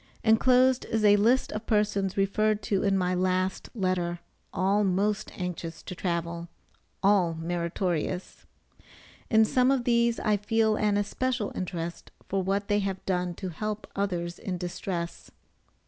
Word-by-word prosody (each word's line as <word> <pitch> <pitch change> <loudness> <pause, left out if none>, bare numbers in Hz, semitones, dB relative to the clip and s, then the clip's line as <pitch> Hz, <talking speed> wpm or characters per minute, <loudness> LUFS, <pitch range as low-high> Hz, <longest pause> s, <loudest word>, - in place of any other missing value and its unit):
Enclosed 250 +3 +4
is 220 -1 0
a 205 0 +7
list 235 +6 +3
of 215 +1 -5
persons 205 -3 +1
referred 215 +2 +1
to 200 -5 0
in 195 -1 +2
my 180 -1 +1
last 185 +1 0
letter, 185 -4 0 0.3
all 200 +3 +2
most 200 +2 0
anxious 170 -2 -5
to - - -6
travel 170 -1 -3 0.6
all 190 -4 +3
meritorious. 170 +1 -3 0.8
In 220 -1 +5
some 250 +3 +3
of 270 -3 +2
these 235 -1 +2
I 210 -1 +2
feel 220 +1 +2
an 210 -1 +1
especial 230 +2 -1
interest 170 -2 -5 0.2
for 195 0 0
what 195 +2 -1
they 205 0 +2
have 195 -2 -3
done 180 -2 -1
to 190 +1 -5
help 215 +5 -4
others 175 -4 -2
in 185 -2 -4
distress. 175 -1 -5
195 Hz, 145 wpm, -28 LUFS, 180-215 Hz, 0.8 s, a